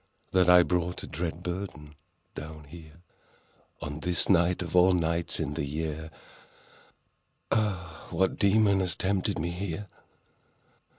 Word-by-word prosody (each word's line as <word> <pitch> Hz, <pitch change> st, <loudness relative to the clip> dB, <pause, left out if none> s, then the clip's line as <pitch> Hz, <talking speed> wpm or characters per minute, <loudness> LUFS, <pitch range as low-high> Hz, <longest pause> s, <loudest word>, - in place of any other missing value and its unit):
— -, -, -41 dB
That 90 Hz, -1 st, +4 dB
I 90 Hz, 0 st, +8 dB
brought 90 Hz, 0 st, -1 dB
a -, -, -7 dB
dread 85 Hz, +2 st, -4 dB
burden 85 Hz, -5 st, -5 dB, 0.4 s
down 75 Hz, 0 st, -8 dB
here— 80 Hz, +2 st, -14 dB, 0.8 s
On 75 Hz, +1 st, -5 dB
this 90 Hz, 0 st, +1 dB
night, 90 Hz, -1 st, +3 dB
of 85 Hz, 0 st, -6 dB
all 90 Hz, +1 st, +6 dB
nights 85 Hz, 0 st, -1 dB
in 70 Hz, -, -2 dB
the 70 Hz, -, -2 dB
year, 80 Hz, +2 st, -4 dB, 1.4 s
Ah, 90 Hz, -6 st, -1 dB
what 95 Hz, -, 0 dB
demon 100 Hz, -1 st, +4 dB
has 90 Hz, -2 st, 0 dB
tempted 95 Hz, 0 st, 0 dB
me 85 Hz, +2 st, -2 dB
here? 95 Hz, +2 st, -4 dB
85 Hz, 135 wpm, -28 LUFS, 80-95 Hz, 1.4 s, I